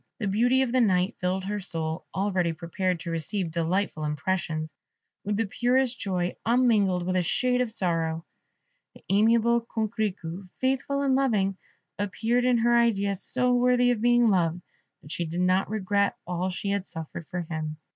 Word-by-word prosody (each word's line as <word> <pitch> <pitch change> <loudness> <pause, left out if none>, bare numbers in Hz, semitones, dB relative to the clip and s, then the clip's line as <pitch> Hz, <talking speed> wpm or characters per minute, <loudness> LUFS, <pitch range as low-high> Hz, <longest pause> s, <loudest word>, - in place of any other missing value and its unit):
The 225 - -3
beauty 245 +7 +3
of 250 - -2
the 255 0 +3
night 185 -3 +2
filled 185 +1 -1
her 205 +1 -2
soul, 165 -3 -4
already 185 -4 0
prepared 170 +1 -2
to 170 - -5
receive 165 +2 -2
delightful 170 0 -1
impressions, 155 +1 -2 0.5
with 205 0 -1
the 225 - +1
purest 245 +3 +1
joy, 180 -3 -2
unmingled 215 -7 +2
with 185 0 -1
a - - +3
shade 250 +8 +1
of 245 -3 -1
sorrow. 165 -4 -1 0.7
The - - -17
amiable 230 +3 +4
Coquerico, 205 -6 -3
faithful 270 +2 0
and 270 -1 +2
loving, 215 -8 +1 0.4
appeared 225 +5 0
in 250 -1 +4
her 240 +1 +3
idea 205 -4 +2
so 250 +6 0
worthy 245 0 +3
of 230 -3 -1
being 240 0 +4
loved, 175 -2 +1 0.4
that 145 - -11
she 170 0 -1
did 170 +3 -3
not 185 +1 +2
regret 200 -1 0
all 180 +1 -2
she 200 +2 -3
had 200 -1 -2
suffered 160 0 -7
for 180 - -3
him. 155 -2 -5
195 Hz, 165 wpm, -26 LUFS, 175-235 Hz, 0.7 s, amiable